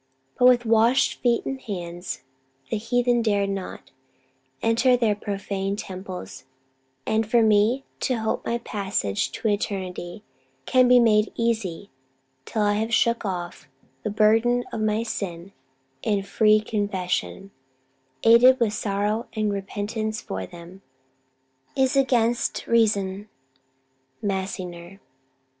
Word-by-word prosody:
But 250 Hz, -, +7 dB
with 245 Hz, -1 st, +4 dB
washed 230 Hz, +4 st, +3 dB
feet 240 Hz, -1 st, +1 dB
and 265 Hz, -1 st, -4 dB
hands, 175 Hz, -, -6 dB, 0.5 s
the -, -, +1 dB
heathen 245 Hz, +1 st, +1 dB
dared 200 Hz, -3 st, +1 dB
not 195 Hz, -1 st, -6 dB, 0.7 s
Enter 235 Hz, +3 st, +3 dB
their 230 Hz, -3 st, +2 dB
profane 200 Hz, -1 st, -3 dB
temples: 185 Hz, -6 st, -8 dB, 0.6 s
and 220 Hz, -1 st, 0 dB
for 235 Hz, 0 st, +4 dB
me 220 Hz, +5 st, +3 dB
To 255 Hz, -, 0 dB
hope 220 Hz, -1 st, -2 dB
my 235 Hz, -, -1 dB
passage 195 Hz, -, -2 dB
to -, -, -3 dB
eternity 195 Hz, -2 st, -3 dB, 0.4 s
Can 255 Hz, -1 st, +4 dB
be 250 Hz, 0 st, +7 dB
made 215 Hz, -2 st, +3 dB
easy, 220 Hz, -6 st, -2 dB, 0.5 s
till 220 Hz, -2 st, -1 dB
I 205 Hz, 0 st, +2 dB
have 225 Hz, +1 st, -2 dB
shook 235 Hz, 0 st, +2 dB
off 175 Hz, -3 st, -5 dB, 0.3 s
The -, -, -3 dB
burthen 225 Hz, +4 st, +3 dB
of 220 Hz, -, -3 dB
my 215 Hz, +1 st, +1 dB
sins 190 Hz, -5 st, -5 dB, 0.5 s
in 205 Hz, -2 st, 0 dB
free 215 Hz, +1 st, +3 dB
confession, 195 Hz, -2 st, -3 dB, 0.7 s
Aided 245 Hz, +3 st, +7 dB
with 225 Hz, -3 st, +1 dB
sorrow 210 Hz, +2 st, -1 dB
and 215 Hz, -2 st, 0 dB
repentance 215 Hz, +2 st, -3 dB
for 95 Hz, -1 st, -5 dB
them, 175 Hz, +3 st, -12 dB, 0.9 s
Is 265 Hz, +1 st, +2 dB
against 240 Hz, -3 st, +1 dB
reason." 205 Hz, -3 st, +1 dB, 0.9 s
MASSINGER. 190 Hz, -2 st, -4 dB
215 Hz, 120 wpm, -24 LUFS, 195-230 Hz, 0.9 s, But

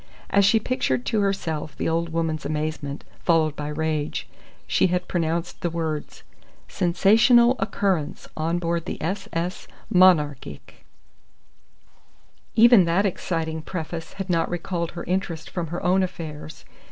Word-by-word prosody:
As 200 Hz, -, +5 dB
she 220 Hz, +3 st, +5 dB
pictured 130 Hz, -, -1 dB
to 220 Hz, -, 0 dB
herself 160 Hz, -7 st, -2 dB
the -, -, -1 dB
old 165 Hz, +1 st, 0 dB
woman's 160 Hz, -1 st, -2 dB
amazement, 150 Hz, -2 st, -3 dB, 0.2 s
followed 160 Hz, -3 st, +2 dB
by 150 Hz, -1 st, -5 dB
rage, 155 Hz, 0 st, -2 dB, 0.4 s
she -, -, +2 dB
had 180 Hz, 0 st, -1 dB
pronounced 170 Hz, 0 st, -2 dB
the 175 Hz, -, 0 dB
words: 160 Hz, -2 st, -4 dB, 0.4 s
SENSATIONAL 230 Hz, +7 st, +4 dB
OCCURRENCE 190 Hz, -7 st, -1 dB
ON 165 Hz, +2 st, -1 dB
BOARD 170 Hz, -1 st, -1 dB
THE -, -, -5 dB
S.S. 180 Hz, 0 st, -3 dB, 0.3 s
MONARCHIC 150 Hz, -, +2 dB, 1.7 s
Even 230 Hz, -4 st, +7 dB
that 175 Hz, +5 st, +2 dB
exciting 165 Hz, -4 st, -2 dB
preface 165 Hz, -1 st, -6 dB
had 195 Hz, -1 st, -5 dB
not 170 Hz, -3 st, +1 dB
recalled 170 Hz, -1 st, -3 dB
her 170 Hz, -, -6 dB
interest 175 Hz, -3 st, -3 dB
from 175 Hz, -2 st, -3 dB
her 175 Hz, +3 st, -5 dB
own 185 Hz, +2 st, +4 dB
affairs. 160 Hz, -4 st, -6 dB
170 Hz, 130 wpm, -24 LUFS, 160-185 Hz, 1.7 s, Even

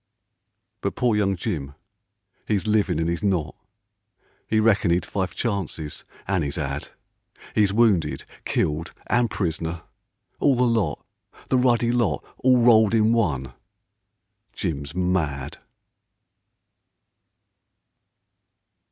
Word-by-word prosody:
But -, -, -2 dB
poor 120 Hz, -3 st, +2 dB
young 100 Hz, -2 st, +1 dB
Jim, 75 Hz, -8 st, -4 dB, 0.7 s
'e's 105 Hz, -3 st, +1 dB
livin' 105 Hz, -6 st, +2 dB
an' 80 Hz, -, 0 dB
'e's 85 Hz, 0 st, -1 dB
not; 90 Hz, -7 st, 0 dB, 1.0 s
'E 110 Hz, -, +4 dB
reckoned 110 Hz, -5 st, +3 dB
'e'd 90 Hz, -, 0 dB
five 95 Hz, -2 st, -3 dB
chances, 95 Hz, -9 st, -3 dB, 0.2 s
an' 95 Hz, -4 st, +1 dB
'e's 70 Hz, -1 st, -3 dB
'ad; 70 Hz, 0 st, -3 dB, 0.7 s
'E's 105 Hz, -3 st, +3 dB
wounded, 105 Hz, -6 st, +2 dB, 0.2 s
killed, 75 Hz, +2 st, -1 dB
and 120 Hz, -1 st, +2 dB
pris'ner, 80 Hz, -3 st, -3 dB, 0.6 s
all 140 Hz, -2 st, +4 dB
the 125 Hz, -, +2 dB
lot. 110 Hz, -11 st, 0 dB, 0.4 s
The 130 Hz, -, +3 dB
ruddy 120 Hz, -2 st, +3 dB
lot 120 Hz, -3 st, 0 dB
all 130 Hz, -1 st, +4 dB
rolled 115 Hz, -2 st, +5 dB
in 110 Hz, +1 st, +4 dB
one. 70 Hz, -, 0 dB, 1.0 s
Jim's 75 Hz, -5 st, -4 dB
mad. 85 Hz, -7 st, -1 dB
95 Hz, 110 wpm, -24 LUFS, 80-115 Hz, 1.0 s, rolled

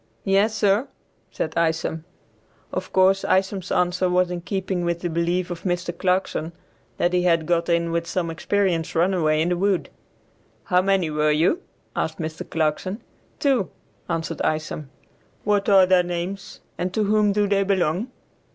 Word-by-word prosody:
"Yes, 200 Hz, +3 st, +3 dB
sir," 210 Hz, +4 st, +2 dB, 0.4 s
said 160 Hz, -, -3 dB
Isom. 160 Hz, -1 st, 0 dB, 0.7 s
Of 185 Hz, -, -4 dB
course 190 Hz, +1 st, +4 dB
Isom's 190 Hz, 0 st, 0 dB
answer 180 Hz, 0 st, +1 dB
was 180 Hz, 0 st, +2 dB
in 175 Hz, -1 st, -4 dB
keeping 190 Hz, -1 st, -2 dB
with 170 Hz, 0 st, -1 dB
the 175 Hz, -, -2 dB
belief 170 Hz, +2 st, 0 dB
of 170 Hz, -1 st, -5 dB
Mr. 175 Hz, -1 st, -2 dB
Clarkson 180 Hz, -3 st, -1 dB, 0.4 s
that 175 Hz, +1 st, +1 dB
he 180 Hz, -, +3 dB
had 170 Hz, -3 st, +2 dB
got 170 Hz, +1 st, +1 dB
in 170 Hz, 0 st, +1 dB
with 170 Hz, 0 st, -1 dB
some 170 Hz, -3 st, -2 dB
experienced 175 Hz, -1 st, 0 dB
runaway 165 Hz, -3 st, +2 dB
in 170 Hz, -, 0 dB
the 180 Hz, -, 0 dB
woods. 195 Hz, 0 st, 0 dB, 0.7 s
"How 180 Hz, -1 st, +3 dB
many 190 Hz, -4 st, +1 dB
were 150 Hz, 0 st, +1 dB
with 150 Hz, 0 st, +3 dB
you?" 180 Hz, -, +2 dB, 0.3 s
asked 160 Hz, 0 st, -2 dB
Mr. 160 Hz, -1 st, -5 dB
Clarkson. 165 Hz, +6 st, -1 dB, 0.3 s
"Two," 265 Hz, -, +1 dB, 0.4 s
answered 165 Hz, -1 st, -2 dB
Isom. 155 Hz, -2 st, -2 dB, 0.5 s
"What 205 Hz, -1 st, +1 dB
are 195 Hz, -2 st, +7 dB
their 185 Hz, -1 st, +4 dB
names, 180 Hz, +3 st, -5 dB, 0.2 s
and 180 Hz, +1 st, -1 dB
to 215 Hz, -, +2 dB
whom 210 Hz, 0 st, +3 dB
do 205 Hz, 0 st, +1 dB
they 200 Hz, 0 st, +2 dB
belong?" 190 Hz, +2 st, 0 dB
180 Hz, 160 wpm, -23 LUFS, 165-195 Hz, 0.7 s, are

